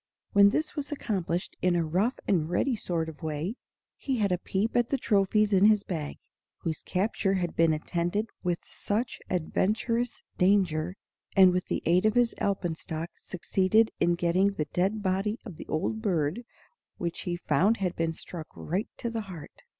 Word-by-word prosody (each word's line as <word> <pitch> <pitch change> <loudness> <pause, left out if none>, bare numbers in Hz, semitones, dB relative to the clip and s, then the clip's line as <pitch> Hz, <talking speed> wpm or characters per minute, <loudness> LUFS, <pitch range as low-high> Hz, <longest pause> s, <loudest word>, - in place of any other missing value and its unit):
When 200 0 +7
this 310 +8 -1
was 290 -1 -4
accomplished 185 - -2
in 180 -1 +3
a 170 -1 +1
rough 190 +11 +1
and 165 -5 +2
ready 240 +8 +1
sort 170 -6 -2
of 155 -3 -9
way, 155 +5 -2 0.4
he 265 -3 -1
had 205 -4 +1
a 180 - +1
peep 200 +5 -1
at 240 -1 +3
the 275 - +1
trophies 210 -1 +2
in 195 +1 +6
his 210 -1 +5
bag, 155 -7 -4 0.4
whose 160 -2 -4
capture 195 0 0
had 175 -3 -2
been 165 -1 +4
attended 175 +6 -1 0.2
with 175 -2 0
such 225 +4 -2
adventurous 220 +7 0 0.2
danger, 180 -3 +2 0.4
and 190 -2 +8
with 180 0 -1
the - - -2
aid 180 +5 +4
of 215 - +1
his 245 -1 +3
alpenstock 165 -4 -2
succeeded 190 +4 +1
in 175 0 +3
getting 180 +4 +2
the 155 -6 -2
dead 195 +4 +1
body 195 +3 0
of 190 -9 -8
the - - -9
old 220 +8 -1
bird, 180 +1 0 0.5
which 170 -1 -3
he 175 -1 -2
found 205 +5 +2
had 185 -3 -1
been 165 0 0
struck 165 0 -8
right 185 +7 -2
to 235 - -3
the 230 -1 -2
heart. 180 -7 -10
185 Hz, 175 wpm, -28 LUFS, 170-215 Hz, 0.5 s, and